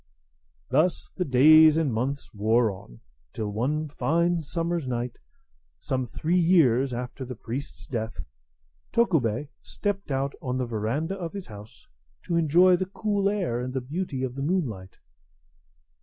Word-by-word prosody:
Thus 155 +7 +1
the 185 - 0
days 155 +4 +7
and 155 -7 +1
months 135 +5 -3
wore 110 +2 +2
on, - - -12 0.3
till 105 -2 -3
one 145 +9 -1
fine 170 +4 +1
summer's 165 0 -2
night, 120 -1 -3 0.6
some 130 -2 -2
three 165 +9 0
years 140 -7 +4
after 125 +2 -5
the 125 0 -6
priest's 125 +6 -7
death, 115 - -4 0.7
Tokubei 145 - +1
stepped 200 -4 -3
out 135 0 -1
on 130 -1 -2
the 130 - -1
veranda 120 - -2
of 175 -4 -6
his 200 -2 -6
house 105 0 -13 0.4
to 170 - -2
enjoy 170 +3 +5
the 185 +1 -2
cool 200 0 0
air 180 - -1
and 130 +1 -5
the - - +1
beauty 140 +1 -4
of 130 -2 -2
the 135 - -5
moonlight. 135 - -2
140 Hz, 145 wpm, -26 LUFS, 120-170 Hz, 0.7 s, days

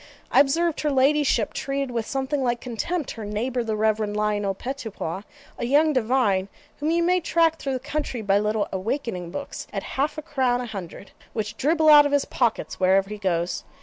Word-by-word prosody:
I - - +5
observed 325 +4 +2
her 300 - +1
ladyship 275 -3 +2
treated 275 -1 -2
with 230 -2 -2
something 270 +1 -1
like 240 -2 0
contempt 265 +7 -3
her 225 - -7
neighbour 235 +4 -2
the 220 -1 -2
Reverend 215 -1 0
Lionel 205 -2 0
Pettipois, 220 -8 -5 0.4
a - - -1
young 300 +4 +4
divine 225 -6 +2 0.3
whom 300 +2 -1
you 340 +1 +2
may 360 +1 +3
track 330 -1 +2
through 275 - -2
the 260 - -1
country 285 -3 -3
by 200 0 +3
little 210 0 0
'awakening' 190 -3 -3
books 280 +11 -6
at - - -4
half 280 +3 -2
a 310 - -5
crown 260 -6 +1
a 250 - -3
hundred, 195 -3 -8 0.2
which 215 -2 -3
dribble 315 +2 +3
out 295 -1 +9
of 285 - -4
his 285 - +3
pockets 240 -3 -1
wherever 195 +2 +3
he 210 - -6
goes. 175 -3 -1
245 Hz, 190 wpm, -24 LUFS, 210-290 Hz, 0.4 s, out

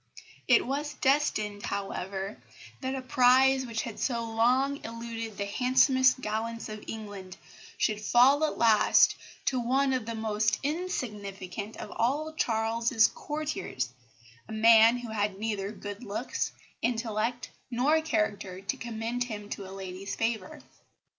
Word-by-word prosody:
It - - +5
was 290 +3 -3
destined, 215 -7 +1
however, 195 0 -4 0.4
that 260 0 -3
a 260 - -5
prize 260 +1 +4
which 225 -1 -2
had 230 -3 -7
so 235 -3 0
long 250 +5 +1
eluded 230 -1 -6
the 200 - -2
handsomest 260 +4 +3
gallants 225 +1 -3
in 215 0 -7
England 205 -4 -8 0.4
should 210 -1 0
fall 255 +7 +5
at 310 - 0
last 220 -2 +5 0.3
to 260 - +1
one 265 +3 +2
of 250 -4 -2
the 230 - -3
most 215 -1 0
insignificant 210 - -4
of 210 - -7
all 295 +7 0
Charles's 225 -3 +2
courtiers, 295 - -3 0.6
a - - -6
man 225 +1 +6
who 245 -1 -7
had 205 -2 -1
neither 205 -2 -2
good 205 +1 -8
looks, 240 +4 -3 0.3
intellect, 230 0 -1 0.2
nor 275 +6 +2
character 205 - -1
to 195 -1 -3
commend 235 +1 -3
him 210 -3 -7
to 195 -2 -5
a - - -10
lady's 195 0 -6
favour. 225 -4 -2
230 Hz, 135 wpm, -29 LUFS, 210-255 Hz, 0.6 s, man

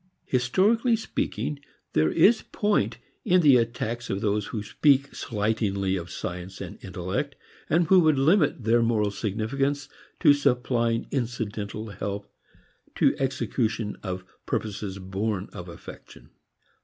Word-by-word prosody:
Historically 205 - +2
speaking, 155 -8 -3 0.3
there 80 0 +3
is 220 +2 +5
point 210 0 0 0.3
in 180 0 +4
the 145 -5 +7
attacks 120 0 -1
of 95 - -1
those 105 -1 0
who 110 -4 -4
speak 140 +5 +2
slightingly 105 -3 -1
of 90 -2 -5
science 90 +1 -6
and - - -8
intellect, 95 +9 -3 0.3
and 170 +2 +3
who 185 +3 +6
would 155 -4 +4
limit 150 - +3
their 115 +2 +4
moral 110 -3 +2
significance 135 +8 -2 0.3
to 145 - +7
supplying 120 -4 +1
incidental 110 -4 -3
help 100 +1 -5 0.6
to - - +3
execution 120 -5 -1
of 95 -2 -4 0.2
purposes 100 -2 -3
born 95 +1 -3
of - - -8
affection. - - -12
115 Hz, 125 wpm, -26 LUFS, 100-140 Hz, 0.6 s, the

